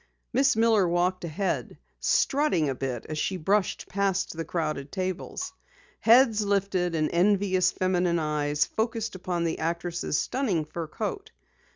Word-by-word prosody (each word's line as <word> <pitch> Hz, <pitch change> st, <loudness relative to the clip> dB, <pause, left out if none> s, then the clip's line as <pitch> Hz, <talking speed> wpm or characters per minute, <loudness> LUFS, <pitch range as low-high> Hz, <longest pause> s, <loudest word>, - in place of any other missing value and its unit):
Miss 270 Hz, -2 st, +3 dB
Miller 220 Hz, -4 st, +4 dB
walked 180 Hz, +2 st, 0 dB
ahead, 180 Hz, +5 st, -2 dB, 0.2 s
strutting 275 Hz, -, +2 dB
a -, -, 0 dB
bit 125 Hz, -3 st, -4 dB
as 155 Hz, -1 st, -4 dB
she 190 Hz, -, -1 dB
brushed 195 Hz, +4 st, 0 dB
past 195 Hz, -2 st, -1 dB
the 165 Hz, -, -3 dB
crowded 155 Hz, -4 st, -3 dB
tables. 185 Hz, -1 st, -4 dB, 0.5 s
Heads 230 Hz, -2 st, +5 dB
lifted 195 Hz, -4 st, 0 dB
and 155 Hz, -1 st, +1 dB
envious 185 Hz, 0 st, +3 dB
feminine 180 Hz, -2 st, +1 dB
eyes 150 Hz, -2 st, 0 dB
focused 225 Hz, 0 st, -2 dB
upon 180 Hz, -2 st, -2 dB
the 165 Hz, -1 st, -1 dB
actress' 170 Hz, 0 st, -2 dB
stunning 205 Hz, -, 0 dB
fur 160 Hz, +1 st, -5 dB
coat. 395 Hz, -, -4 dB
185 Hz, 140 wpm, -27 LUFS, 165-205 Hz, 0.5 s, Heads